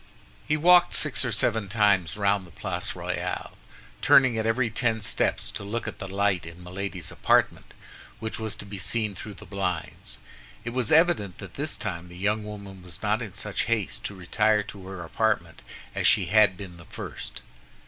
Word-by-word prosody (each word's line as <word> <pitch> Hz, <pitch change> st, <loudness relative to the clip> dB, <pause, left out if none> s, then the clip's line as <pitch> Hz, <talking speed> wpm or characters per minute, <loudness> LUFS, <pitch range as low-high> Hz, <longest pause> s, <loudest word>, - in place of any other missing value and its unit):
He 155 Hz, -, +2 dB
walked 175 Hz, +2 st, +6 dB
six 140 Hz, -9 st, +2 dB
or 120 Hz, -, -1 dB
seven 110 Hz, -3 st, +2 dB
times 100 Hz, -5 st, +3 dB
round 100 Hz, -2 st, +1 dB
the -, -, -16 dB
Place -, -, -4 dB
Royale, -, -, -3 dB, 0.5 s
turning 130 Hz, -3 st, +6 dB
at 110 Hz, 0 st, 0 dB
every 115 Hz, 0 st, +1 dB
ten 110 Hz, 0 st, +1 dB
steps 105 Hz, -, 0 dB
to -, -, -6 dB
look 110 Hz, +3 st, -3 dB
at -, -, -6 dB
the 95 Hz, -, -5 dB
light 100 Hz, -1 st, +1 dB
in 85 Hz, +2 st, -10 dB
Milady's 90 Hz, -1 st, -5 dB
apartment, -, -, +2 dB, 0.5 s
which 110 Hz, +1 st, -4 dB
was 110 Hz, -1 st, -3 dB
to -, -, -7 dB
be 100 Hz, -1 st, -7 dB
seen 110 Hz, +1 st, -1 dB
through 100 Hz, +2 st, -8 dB
the -, -, -12 dB
blinds. 90 Hz, -10 st, -4 dB, 0.5 s
It 120 Hz, -, -2 dB
was 125 Hz, -2 st, -1 dB
evident 160 Hz, -, +4 dB
that 100 Hz, -, -9 dB
this 150 Hz, +2 st, -3 dB
time 90 Hz, -4 st, -4 dB
the 85 Hz, -, -11 dB
young 105 Hz, +3 st, +1 dB
woman 100 Hz, -3 st, -8 dB
was 90 Hz, -1 st, -8 dB
not 110 Hz, +3 st, +1 dB
in 105 Hz, -4 st, -6 dB
such 100 Hz, -1 st, -2 dB
haste 115 Hz, -5 st, -1 dB
to 100 Hz, -, -4 dB
retire 105 Hz, +3 st, +2 dB
to 100 Hz, -2 st, -9 dB
her 95 Hz, -2 st, -6 dB
apartment 85 Hz, -3 st, 0 dB, 0.3 s
as -, -, +2 dB
she 105 Hz, -5 st, +5 dB
had 105 Hz, 0 st, +5 dB
been 90 Hz, -3 st, -9 dB
the 85 Hz, -, -13 dB
first. -, -, -7 dB
105 Hz, 190 wpm, -27 LUFS, 95-110 Hz, 0.5 s, walked